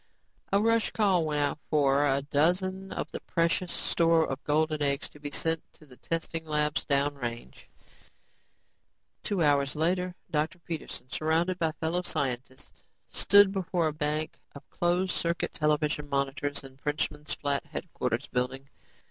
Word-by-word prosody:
A 200 - +4
rush 230 +1 +3
call 190 -6 +2
went 150 -1 0
out 145 +1 0
for 140 -2 +3
a 140 -1 +2
dozen 185 +6 +1
of - - -4
the - - -5
precious 170 +1 0
store 165 -1 +3
of 135 +1 -4
golden 155 0 +1
eggs 140 0 +1
to 150 - -16
be 145 0 -5
sent 160 +2 0
to 155 - -19
the 125 -4 -16
testing 165 0 -3
labs 150 -1 0
down 140 0 +2
range. 120 -4 -7 1.5
Two 195 -5 0
hours 140 -2 +3
later, 180 +3 0 0.2
Dr. 155 +4 0
Peterson, 160 -6 -6
surrounded 165 +4 +1
by 160 -2 +1
fellow 165 +3 -1
scientists, 130 -6 -4 0.3
stood 200 -1 +6
before 180 -4 0
a - - -5
bank 155 +1 -2 0.2
of 140 - -11
closed 180 +2 +1
circuit 170 +1 -1
television 150 -1 0
monitors 140 +1 -1
in 135 -1 -12
the - - -33
Frenchman's 150 0 -2
Flat 140 -1 -1
headquarters 125 -6 -3
building. 130 +1 -3
155 Hz, 150 wpm, -29 LUFS, 140-170 Hz, 1.5 s, stood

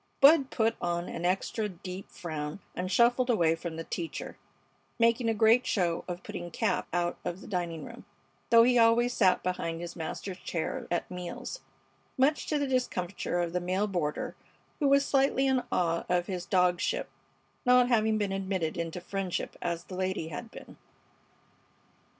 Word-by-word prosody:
Bud 280 -1 +7
put 225 -1 +1
on 175 0 -1
an 170 - -4
extra 195 +4 0
deep 185 +1 -8
frown 155 0 -5 0.2
and 185 +1 -3
shuffled 245 +3 +4
away 170 -9 +4
from 165 0 -5
the 165 - -4
teacher, 165 0 -5 0.6
making 230 0 +3
a - - +2
great 225 +4 +4
show 175 -4 +1
of 180 0 -5
putting 175 - -6
Cap 185 +2 -1
out 175 0 -1
of 175 +1 -4
the - - -12
dining 170 -4 -3
room, - - -11 0.4
though 230 0 +8
he 245 0 +4
always 235 +2 +4
sat 190 -6 +3
behind 165 -2 -2
his 175 0 -6
master's 180 +3 -5
chair 160 -2 -3
at 175 - -2
meals, 180 - -6 0.6
much 280 +4 +2
to 300 - +1
the 285 - 0
discomfiture 200 -9 -1
of 170 -1 -1
the 180 - 0
male 185 +3 0
boarder, 175 -7 -2 0.4
who 290 - +2
was 280 0 +5
slightly 270 -1 +2
in 265 -1 +3
awe 170 -2 +1
of 175 -1 +2
his 180 -2 -4
dogship, 180 - +2 0.6
not 250 -1 +5
having 220 -3 +3
been 205 -2 -1
admitted 190 -4 -2
into 170 +1 -3
friendship 190 0 -3
as 170 0 -2
the 185 - -11
lady 185 -3 -2
had 225 +9 -6
been. - - -12
185 Hz, 170 wpm, -29 LUFS, 175-235 Hz, 0.6 s, though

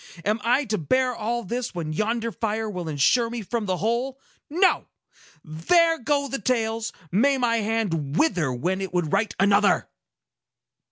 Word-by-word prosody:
Am 210 +2 0
I 250 +5 +2
to 215 -3 -1
bear 255 - +1
all 235 +2 -2
this, 235 0 -4
when 160 -3 -3
yonder 225 +5 -1
fire 220 0 -2
will 180 -5 -5
insure 195 - +2
me 235 -1 -5
from 220 +1 -3
the 185 -1 0
whole? 240 +7 -1 0.3
No! 365 +5 +2 0.6
There 325 - +2
go 280 +3 0
the 270 -3 -4
tales! 225 -1 -1 0.2
May 270 +9 +3
my 240 -2 +1
hand 200 -10 -1
wither 180 - +2
when 180 +10 -2
it 190 -2 -5
would 170 -4 0
write 205 +2 +1
another!" 200 +1 +3
225 Hz, 160 wpm, -24 LUFS, 185-245 Hz, 0.6 s, May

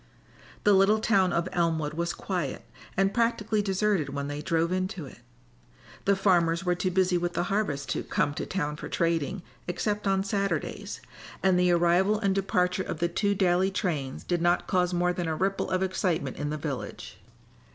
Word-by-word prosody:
The 205 - +5
little 195 +3 +5
town 200 -4 +3
of 170 +1 0
Elmwood 160 -3 0
was 170 +2 -2
quiet 175 -9 -3 0.3
and 195 +1 +2
practically 220 -2 +1
deserted 195 -5 +1
when 140 0 -3
they 145 0 -4
drove 165 +2 0
into 185 -3 -2
it. 130 - -13 0.9
The 200 - +4
farmers 175 -3 +2
were 180 - +3
too 180 +1 -1
busy 185 -1 +2
with 175 0 -2
the - - 0
harvest 145 -10 -1
to - - -1
"come 145 - 0
to - - -4
town 150 -5 -2
for - - -7
trading" 170 +2 0 0.2
except 205 +3 -1
on 195 0 +2
Saturdays, 200 0 -2 0.4
and 185 -2 +4
the 180 0 +3
arrival 175 +4 +3
and 200 -3 +1
departure 185 -1 +1
of 170 - -4
the 170 +2 0
two 200 +3 0
daily 185 0 +3
trains 155 -9 -2
did 175 -2 -1
not 175 +1 +2
cause 180 -1 +1
more 180 0 +1
than 175 -1 -3
a 160 - -1
ripple 195 +4 -1
of 185 0 +1
excitement 180 -7 -1
in 145 +1 -2
the 155 - -2
village. 145 -3 -6
180 Hz, 185 wpm, -28 LUFS, 165-195 Hz, 0.9 s, The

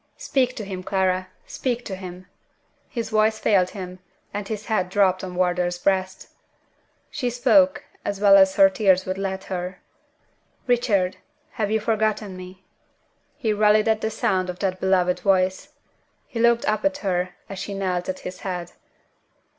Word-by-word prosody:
Speak 255 -3 0
to 215 - -5
him, 190 -2 -5
Clara! 185 -1 0 0.2
speak 245 -2 -3
to 190 - -4
him!" 185 -1 -9 0.6
His 230 -2 -4
voice 215 0 +3
failed 190 -5 +2
him, 185 -2 -8 0.3
and 205 0 -4
his 215 -1 -5
head 200 -5 0
dropped 190 -1 +2
on 180 -1 -6
Wardour's 180 -1 0
breast. 190 +1 -1 0.8
She 250 - -2
spoke, 275 +4 +3 0.2
as 200 -1 -3
well 200 -1 +7
as 190 -1 +6
her 195 - +7
tears 190 -2 +2
would 185 +1 -3
let 190 -1 -3
her. 180 -1 -5 0.9
"Richard, 215 -7 +1 0.3
have 210 -2 -2
you 220 +1 +1
forgotten 215 -2 -1
me?" 185 +1 -11 0.7
He 225 -7 0
rallied 210 +1 +4
at 220 0 +2
the 220 - 0
sound 185 -4 0
of 180 - -5
that 185 -1 -2
beloved 180 -1 +2
voice. 185 0 +1 0.6
He 230 - -6
looked 235 0 +3
up 215 0 0
at 290 -1 +1
her 180 -1 -1
as 195 -1 -7
she 200 +1 -5
knelt 180 -2 -2
at 185 - -4
his 185 0 -7
head. 180 -2 -5
195 Hz, 160 wpm, -23 LUFS, 185-215 Hz, 0.9 s, well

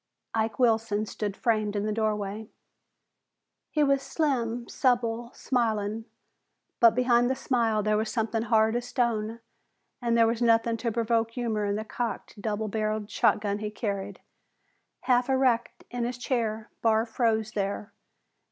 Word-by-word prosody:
Ike 220 0 0
Wilson 225 -3 +2
stood 205 -1 -4
framed 215 -3 0
in 205 0 -1
the 215 - 0
doorway. 215 -1 -2 1.2
He 300 - +2
was 275 -1 +3
slim, 245 -5 -1
supple, 240 -3 0
smiling, 220 -3 -1 0.7
but 230 -1 +6
behind 245 -1 +3
the 265 - +1
smile 230 -5 +1
there 215 0 +2
was 220 +1 -1
something 225 -1 -1
hard 220 -1 +3
as 240 0 -2
stone 230 -3 -1 0.6
and 235 -1 +1
there 230 - +6
was 230 +1 0
nothing 230 0 +3
to 230 0 -2
provoke 230 0 +1
humor 230 -3 -2
in 200 0 0
the 215 +1 -3
cocked, 230 -2 -5
double 215 +1 -2
barreled 215 0 -2
shotgun 205 -1 +1
he 210 0 -3
carried. 200 -2 -4 0.8
Half 250 0 +2
erect 260 -3 +1
in 245 -1 -2
his 245 +1 -2
chair, 225 -4 -2
Barr 225 0 +3
froze 225 -2 0
there. 200 +1 -3
225 Hz, 145 wpm, -27 LUFS, 215-240 Hz, 1.2 s, but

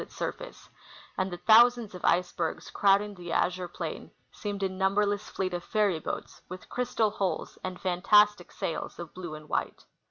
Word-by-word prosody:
87 - - -7
its - - -17
surface, - - -6 0.5
and 185 0 -1
the 175 - -6
thousands 230 +2 +5
of 180 - -9
icebergs 175 -2 0
crowding 205 +1 +3
the 175 -3 -8
azure 180 +1 0
plain 175 - -6 0.2
seemed 205 -1 -4
a - - +3
numberless 200 +2 0
fleet 185 -1 -2
of 175 0 -3
fairy 205 -6 +1
boats - - -6
with 185 +1 -9
crystal 235 -3 0
hulls 195 -3 -3
and 185 -1 -5
fantastic 195 +1 +3
sails 165 - -4
of 170 -2 -8
blue 175 -4 -6
and 155 0 -11
white. - - -3
190 Hz, 170 wpm, -29 LUFS, 180-210 Hz, 0.5 s, thousands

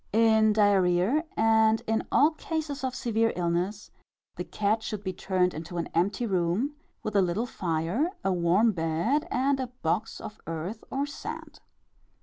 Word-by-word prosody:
In 220 -1 +5
diarrhœa, 200 - +3
and 220 0 +4
in 220 0 -1
all 300 +3 +5
cases 310 -3 -4
of 260 -1 -2
severe 225 -1 +1
illness, 180 +4 -2 0.4
the - - -4
cat 215 +2 0
should 215 -2 -5
be 190 -1 -3
turned 180 0 0
into 165 +3 -6
an 170 - -2
empty 195 +7 +1
room, 190 - 0 0.3
with 215 - -4
a 200 - +6
little 185 +6 0
fire, 180 - -1
a 195 - +1
warm 180 +6 +3
bed 180 - 0
and 270 +2 +1
a 260 - -2 0.2
box 165 +6 -1
of 210 - -9
earth 165 +7 -5
or 275 +2 -1
sand. 290 - -8
210 Hz, 155 wpm, -27 LUFS, 180-235 Hz, 0.4 s, a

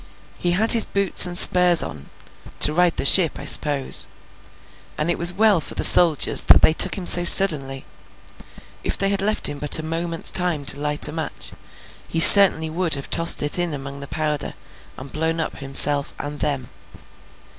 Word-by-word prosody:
He 175 0 -2
had 220 +5 +1
his 230 - +5
boots 200 -2 0
and 175 0 -6
spurs 180 -2 +4
on—to 75 - -7
ride 175 +1 -1
to - - -28
the - - -5
ship, 165 +2 +2
I 140 - -12
suppose—and 150 +2 -3
it - - -6
was 170 +1 +2
well 200 -2 -1
for - - -11
the - - -5
soldiers 165 -5 +2
that - - +2
they 155 - +2
took - - +1
him 185 - -10
so 175 0 +4
suddenly. 150 -8 +1 1.0
If - - -6
they 195 - -4
had 200 -1 -5
left 215 +2 -2
him 145 -1 -8
but 150 +2 +1
a 160 - -9
moment's 165 +1 -8
time 175 -6 -3
to 140 - 0
light 150 0 -2
a - - -10
match, 160 -1 -9 0.6
he 165 - -6
certainly 165 -2 +8
would 170 -1 -3
have 140 - -12
tossed 165 -2 -1
it 145 +4 -4
in 175 -4 -6
among 140 0 -12
the 140 - -12
powder, 150 -1 -7 0.4
and 130 +1 -14
blown 160 +2 -6
up 160 - -8
himself 140 +1 +2
and 145 0 -10
them. 135 -4 -6
160 Hz, 185 wpm, -17 LUFS, 145-180 Hz, 1.0 s, certainly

